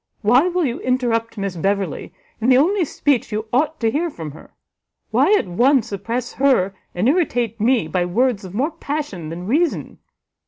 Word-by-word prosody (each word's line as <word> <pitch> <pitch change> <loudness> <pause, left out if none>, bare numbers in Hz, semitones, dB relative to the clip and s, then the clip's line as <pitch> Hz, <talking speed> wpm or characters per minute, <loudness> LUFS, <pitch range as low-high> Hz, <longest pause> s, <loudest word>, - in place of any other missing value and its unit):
Why 245 - +5
will 360 -2 0
you 245 -2 -2
interrupt 235 -3 -1
Miss 195 -2 -3
Beverley 195 +3 -2 0.3
in 230 +3 +1
the 255 - +6
only 355 +6 +3
speech 280 -4 0
you 215 +1 -2
ought 310 +5 +1
to 225 -1 +2
hear 335 +6 0
from 160 - -7
her? 155 - -15 0.6
Why, - - +3
at - - -1
once, 240 +7 +2
oppress 230 +5 -3
her, 255 -9 +2 0.2
and 180 +6 +1
irritate 245 - 0
me, 235 -6 +2
by 175 +2 0
words 225 +3 +1
of 190 0 -9
more 280 +8 0
passion 290 - -5
than 170 +2 -6
reason? 310 - 0
240 Hz, 180 wpm, -20 LUFS, 200-280 Hz, 0.6 s, the